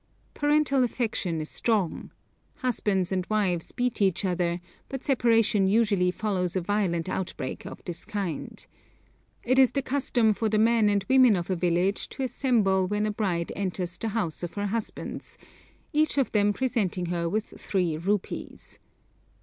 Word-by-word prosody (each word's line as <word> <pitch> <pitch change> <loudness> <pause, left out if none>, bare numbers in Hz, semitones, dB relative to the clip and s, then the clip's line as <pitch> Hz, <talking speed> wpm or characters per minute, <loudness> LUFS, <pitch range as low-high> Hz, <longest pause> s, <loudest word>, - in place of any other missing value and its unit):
Parental 290 -2 +2
affection 220 -9 -1
is 155 - -6
strong. 210 -8 -1 0.5
Husbands 205 -7 0
and 185 -1 0
wives 190 -6 0
beat 245 -3 -2
each 195 0 +2
other, 175 -1 0 0.3
but 270 -1 -5
separation 230 -6 +3
usually 200 -3 +3
follows 185 -2 -1
a 185 - +1
violent 180 -3 0
outbreak 175 -8 -4
of - - -10
this 175 -1 -5
kind. 195 -7 -5 0.8
It 255 +2 +3
is 260 -2 +5
the 275 - 0
custom 255 -5 +2
for 220 +1 -1
the 215 - +1
men 225 -1 +4
and 200 -1 +1
women 255 -4 +6
of 175 +1 -3
a - - +2
village 180 +3 0
to 270 - -5
assemble 215 -8 +2
when 210 +2 0
a 215 - 0
bride 185 -5 -1
enters 180 -2 -3
the 225 - -2
house 210 -7 -2
of 175 -1 -5
her 205 0 -2
husbands, 220 +2 -5 0.6
each 305 0 +2
of 275 - +2
them 205 -1 +3
presenting 205 -7 -1
her 170 -1 -1
with 215 +4 -2
three 180 -5 0
rupees. 190 +5 -3
205 Hz, 160 wpm, -27 LUFS, 180-230 Hz, 0.8 s, women